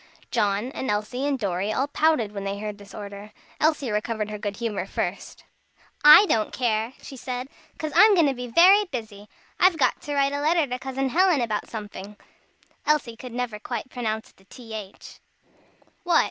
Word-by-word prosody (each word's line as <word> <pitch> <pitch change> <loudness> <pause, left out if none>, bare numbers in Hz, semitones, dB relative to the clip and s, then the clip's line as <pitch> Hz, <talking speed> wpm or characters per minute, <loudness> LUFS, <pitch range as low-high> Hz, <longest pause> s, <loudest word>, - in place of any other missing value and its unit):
John, 205 +5 0
and 265 - -4
Elsie, 215 +6 -1
and 280 -2 0
Dorry, 200 -2 -2
all 265 +5 0
pouted 290 -7 +1
when 200 -1 -6
they 195 0 -3
heard 210 0 -6
this 200 - -13
order. 205 0 -8 0.3
Elsie 300 -6 +1
recovered 210 0 -2
her 210 - -5
good 205 -1 -4
humor 210 -5 -3
first. 185 0 -4 0.6
"I 300 +7 +10
don't 220 - 0
care," 225 -1 -1
she 270 - -9
said, 255 0 -5 0.3
"'cause 310 -2 -4
I'm 415 +4 +7
going 335 -4 +4
to 275 - +2
be 250 -1 -6
very 375 - +6
busy; 220 - -7 0.3
I've 365 -2 +5
got 285 - +1
to 290 0 -4
write 280 0 +2
a 285 - -2
letter 320 +1 +3
to 250 -2 -5
Cousin 265 0 -2
Helen 355 +1 +3
about 215 -3 -2
somefing." 210 -2 -8 0.7
(Elsie 285 -6 +1
never 240 -2 -4
could - - -41
quite 260 - -5
pronounce 220 -3 -3
the 190 - -26
th.) 220 -3 -10 0.8
"What?" 350 -2 +4
240 Hz, 180 wpm, -25 LUFS, 210-285 Hz, 0.8 s, I